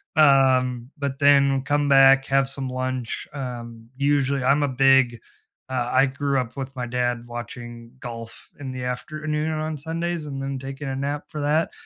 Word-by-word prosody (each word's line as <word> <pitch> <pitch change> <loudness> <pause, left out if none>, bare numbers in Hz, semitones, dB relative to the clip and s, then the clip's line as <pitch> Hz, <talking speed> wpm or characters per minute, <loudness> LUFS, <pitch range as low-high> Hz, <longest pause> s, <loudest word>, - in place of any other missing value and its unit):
Um, 130 -4 +4
but 140 -1 -3
then 140 -1 +4
come 145 +1 +1
back, 135 0 +6
have 135 0 +2
some 135 -2 -2
lunch 130 -2 -3
um, 120 -4 -7
usually, 140 -1 +1
I'm 140 +3 +3
a 145 - +2
big 135 -2 +4 0.5
uh, 125 -2 -1
I 135 +2 +5
grew 140 +1 -1
up 120 -2 -4
with 135 -1 -5
my 125 -1 -3
dad 120 -1 -1
watching 120 0 -8
golf 115 -2 -9
in 135 -2 -5
the 130 -1 -5
afternoon 155 +4 -3
on 155 0 -3
Sundays 165 +2 -3
and 135 -2 -5
then 135 0 -3
taking 135 +2 -7
a 135 - -3
nap 140 +2 -3
for 150 -2 -6
that. 150 +3 +1
135 Hz, 170 wpm, -24 LUFS, 125-145 Hz, 0.5 s, back